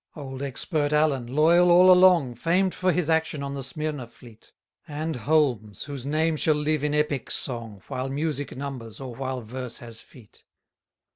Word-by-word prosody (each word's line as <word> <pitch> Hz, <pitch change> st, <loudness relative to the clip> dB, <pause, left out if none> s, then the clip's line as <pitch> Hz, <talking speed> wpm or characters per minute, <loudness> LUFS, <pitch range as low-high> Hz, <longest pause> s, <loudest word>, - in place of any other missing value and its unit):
172 140 Hz, -4 st, -8 dB
Old -, -, -1 dB
expert 145 Hz, +3 st, -2 dB
Allen, 140 Hz, -5 st, +1 dB
loyal 165 Hz, +7 st, +4 dB
all 180 Hz, +2 st, +7 dB
along, 180 Hz, -8 st, +5 dB
Famed 175 Hz, -, +1 dB
for 185 Hz, 0 st, +1 dB
his 175 Hz, -2 st, 0 dB
action 160 Hz, -3 st, 0 dB
on 140 Hz, 0 st, -4 dB
the 140 Hz, -, -4 dB
Smyrna 150 Hz, -1 st, -4 dB
fleet: 115 Hz, -1 st, -18 dB, 0.4 s
And 155 Hz, +1 st, -4 dB
Holmes, 125 Hz, -, 0 dB
whose 140 Hz, -3 st, -7 dB
name 155 Hz, +2 st, +1 dB
shall 155 Hz, 0 st, +2 dB
live 150 Hz, 0 st, 0 dB
in 150 Hz, 0 st, 0 dB
epic 150 Hz, -4 st, -1 dB
song, 115 Hz, -6 st, -4 dB
While 130 Hz, +1 st, -4 dB
music 145 Hz, -1 st, -3 dB
numbers, 130 Hz, -5 st, -7 dB
or 130 Hz, -3 st, -7 dB
while 130 Hz, +1 st, -4 dB
verse 125 Hz, +2 st, -7 dB
has 115 Hz, -1 st, -10 dB
feet. 115 Hz, -5 st, -18 dB
145 Hz, 170 wpm, -25 LUFS, 125-155 Hz, 0.4 s, all